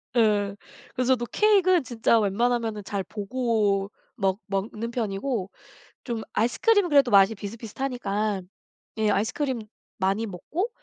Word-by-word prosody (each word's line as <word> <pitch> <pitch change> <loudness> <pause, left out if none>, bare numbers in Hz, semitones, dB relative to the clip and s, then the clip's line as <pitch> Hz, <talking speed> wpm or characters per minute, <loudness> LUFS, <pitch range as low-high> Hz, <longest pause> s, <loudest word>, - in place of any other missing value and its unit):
예. 205 -3 +2 0.4
그래서 255 0 +3
저도 240 -2 -1
케익은 375 - +4
진짜 230 -2 +2
웬만하면은 220 +1 0
잘 195 0 -3
보고 205 -1 0 0.2
먹 195 -3 0
먹는 210 +3 -3
편이고 215 -2 -2 0.5
좀 235 -3 -3
아이스크림은 370 - +2
그래도 280 -4 +5
맛이 200 0 +6
비슷비슷하니까 215 -1 -3 0.6
예 215 -1 +2
아이스크림 230 +5 0 0.4
많이 195 +4 0
먹고 305 - -3
225 Hz, 300 characters per minute, -26 LUFS, 200-250 Hz, 0.6 s, 맛이